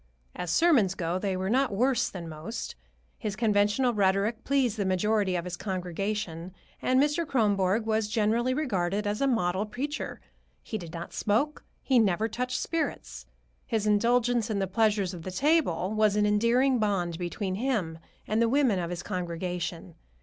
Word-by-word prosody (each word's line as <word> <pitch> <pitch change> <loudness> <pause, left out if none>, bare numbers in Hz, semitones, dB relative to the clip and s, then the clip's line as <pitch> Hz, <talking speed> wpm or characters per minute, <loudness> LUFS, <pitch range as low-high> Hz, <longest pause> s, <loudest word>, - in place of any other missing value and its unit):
As 180 - -4
sermons 230 - +4
go, 170 +1 -2
they 190 -1 -1
were 190 +1 -2
not 260 +4 +2
worse 250 +3 +2
than 175 -3 -7
most. 165 +9 -6 0.5
His 210 -2 -3
conventional 215 +3 +2
rhetoric 205 +3 +1
pleased 265 -5 +1
the 205 - 0
majority 190 +1 +1
of 175 0 -2
his 180 0 -4
congregation, 185 -1 -4 0.3
and 255 0 +3
Mr. 295 +4 +2
Kronborg 210 - +1
was 220 -1 +1
generally 225 +3 +1
regarded 210 - -1
as 205 +3 -1
a 275 - +3
model 190 -6 +1
preacher. 265 +8 -4 0.4
He 220 - -4
did 170 -3 -9
not 170 0 -7
smoke, 235 +9 0 0.2
he 260 -3 +4
never 215 0 +2
touched 250 +3 -2
spirits. 330 -1 -3 0.4
His 220 -3 -1
indulgence 235 +2 +2
in 215 - -1
the 195 - +1
pleasures 200 -1 +1
of 175 - -7
the 185 - -6
table 215 - +1
was 215 -1 +3
an 210 0 +3
endearing 235 +5 +3
bond 180 -5 0
between 185 +2 -3
him 195 -8 -1 0.3
and 215 +2 +1
the 230 - +3
women 255 -7 +3
of 170 -1 -3
his 175 -1 -5
congregation. 175 -1 -4
210 Hz, 165 wpm, -28 LUFS, 185-240 Hz, 0.5 s, sermons